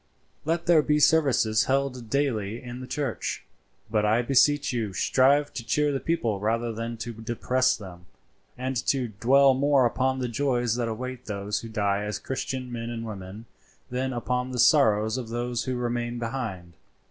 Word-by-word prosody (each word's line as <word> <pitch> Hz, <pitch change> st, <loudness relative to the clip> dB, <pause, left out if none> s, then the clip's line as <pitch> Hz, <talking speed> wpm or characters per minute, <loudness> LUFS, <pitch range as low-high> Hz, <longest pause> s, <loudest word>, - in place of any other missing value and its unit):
"Let 165 Hz, +2 st, -1 dB
there 170 Hz, -3 st, +5 dB
be 150 Hz, 0 st, +1 dB
services 135 Hz, -9 st, +3 dB
held 130 Hz, -3 st, -1 dB
daily 115 Hz, -6 st, -1 dB
in 125 Hz, 0 st, -8 dB
the 130 Hz, -, -8 dB
church, 130 Hz, -2 st, -3 dB, 0.5 s
but 105 Hz, -2 st, +2 dB
I 110 Hz, +3 st, +2 dB
beseech 140 Hz, +2 st, +3 dB
you 110 Hz, -5 st, -2 dB
strive 140 Hz, +9 st, +3 dB
to 120 Hz, -, -5 dB
cheer 150 Hz, +5 st, +1 dB
the 135 Hz, -, -1 dB
people 120 Hz, -12 st, -1 dB
rather 115 Hz, +3 st, -1 dB
than 115 Hz, +1 st, -5 dB
to 115 Hz, +2 st, -5 dB
depress 120 Hz, +3 st, 0 dB
them, 90 Hz, -4 st, -11 dB, 0.5 s
and 130 Hz, +1 st, -3 dB
to 130 Hz, -4 st, +1 dB
dwell 130 Hz, +7 st, +4 dB
more 140 Hz, 0 st, +3 dB
upon 130 Hz, +2 st, +1 dB
the 125 Hz, -1 st, -2 dB
joys 120 Hz, -2 st, 0 dB
that 120 Hz, -1 st, -1 dB
await 125 Hz, +2 st, -5 dB
those 105 Hz, 0 st, -2 dB
who 115 Hz, -, -8 dB
die 100 Hz, -2 st, 0 dB
as 105 Hz, -1 st, -3 dB
Christian 130 Hz, -1 st, -4 dB
men 115 Hz, -1 st, -4 dB
and 115 Hz, -1 st, -5 dB
women 100 Hz, 0 st, -8 dB, 0.5 s
than 130 Hz, +1 st, -1 dB
upon 125 Hz, +1 st, -2 dB
the 130 Hz, -, -5 dB
sorrows 110 Hz, -4 st, +4 dB
of 120 Hz, -3 st, -7 dB
those 120 Hz, +1 st, -2 dB
who 130 Hz, -, -2 dB
remain 120 Hz, 0 st, -2 dB
behind. 115 Hz, -8 st, -5 dB
120 Hz, 170 wpm, -26 LUFS, 110-130 Hz, 0.5 s, there